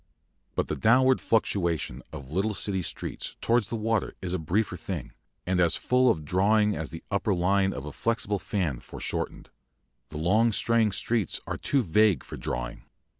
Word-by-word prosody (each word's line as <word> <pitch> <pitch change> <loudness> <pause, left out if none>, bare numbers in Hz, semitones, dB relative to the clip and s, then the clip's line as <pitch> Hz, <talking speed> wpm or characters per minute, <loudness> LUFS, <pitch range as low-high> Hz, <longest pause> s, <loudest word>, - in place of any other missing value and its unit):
But - - 0
the - - -2
downward 130 +3 +4
fluctuation 85 - 0
of 70 -3 -9
little 100 +5 0
City 95 0 -2
streets 80 - -4
towards 120 +1 +2
the - - -4
water 110 -1 -1
is 90 -1 -3
a 95 - 0
briefer 95 +7 0
thing, - - -5 0.3
and 90 0 +1
as 85 -2 +4
full 125 0 +3
of 80 -9 0
drawing 105 +5 +3
as 80 0 -4
the 80 - -9
upper 100 0 +1
line 95 +2 +2
of 70 - -6
a 75 - -6
flexible 110 -3 0
fan 85 - -2
foreshortened. - - -5 0.6
The 75 - -7
long 105 +8 +3
straying 115 -1 +2
streets 105 0 0
are - - -3
too 135 -3 +1
vague 105 +1 +3
for - - -8
drawing. - - -4
100 Hz, 175 wpm, -27 LUFS, 85-110 Hz, 0.6 s, downward